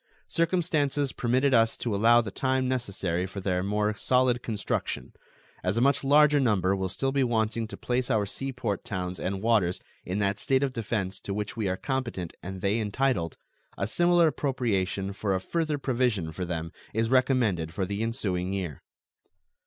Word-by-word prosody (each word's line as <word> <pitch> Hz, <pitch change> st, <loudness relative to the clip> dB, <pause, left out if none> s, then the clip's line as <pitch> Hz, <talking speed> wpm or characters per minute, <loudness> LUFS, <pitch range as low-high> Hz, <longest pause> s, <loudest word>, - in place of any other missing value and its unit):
Circumstances 155 Hz, -5 st, +1 dB
permitted 130 Hz, +3 st, +1 dB
us 115 Hz, -1 st, +4 dB
to 115 Hz, -, -2 dB
allow 115 Hz, +3 st, +5 dB
the 105 Hz, -4 st, -6 dB
time 130 Hz, +2 st, 0 dB
necessary 95 Hz, -8 st, -1 dB
for 95 Hz, +1 st, -7 dB
their 90 Hz, -1 st, 0 dB
more 105 Hz, +2 st, 0 dB
solid 125 Hz, +2 st, +2 dB
construction. 110 Hz, -4 st, -3 dB, 0.5 s
As 95 Hz, +4 st, 0 dB
a -, -, +3 dB
much 140 Hz, +2 st, +3 dB
larger 150 Hz, +1 st, +5 dB
number 100 Hz, -7 st, +2 dB
will 95 Hz, -1 st, -2 dB
still 135 Hz, +8 st, -1 dB
be 135 Hz, 0 st, +2 dB
wanting 115 Hz, -2 st, 0 dB
to -, -, -8 dB
place 125 Hz, 0 st, -1 dB
our 105 Hz, -2 st, +2 dB
sea 135 Hz, +7 st, -4 dB
port 115 Hz, -6 st, -3 dB
towns 90 Hz, -2 st, -4 dB
and 95 Hz, +2 st, -3 dB
waters 105 Hz, -6 st, +2 dB, 0.2 s
in 90 Hz, +2 st, -3 dB
that 100 Hz, -1 st, 0 dB
state 135 Hz, 0 st, +2 dB
of 135 Hz, -2 st, -1 dB
defense 105 Hz, -5 st, -2 dB
to 100 Hz, -, -5 dB
which 105 Hz, -1 st, -3 dB
we 110 Hz, -4 st, -1 dB
are 95 Hz, -, -1 dB
competent 120 Hz, -, -3 dB
and 95 Hz, 0 st, -7 dB
they 100 Hz, +4 st, +1 dB
entitled, 105 Hz, -, 0 dB, 0.4 s
a 100 Hz, -, 0 dB
similar 175 Hz, +5 st, +4 dB
appropriation 100 Hz, -9 st, -1 dB
for 100 Hz, -1 st, -1 dB
a -, -, 0 dB
further 155 Hz, -, -1 dB
provision 120 Hz, -, 0 dB
for 90 Hz, +3 st, -4 dB
them 85 Hz, -1 st, -4 dB, 0.2 s
is 115 Hz, +1 st, +1 dB
recommended 125 Hz, -, +2 dB
for 95 Hz, +2 st, -2 dB
the 100 Hz, +3 st, -3 dB
ensuing 100 Hz, -6 st, -1 dB
year. 90 Hz, -8 st, -4 dB
110 Hz, 175 wpm, -27 LUFS, 95-130 Hz, 0.5 s, allow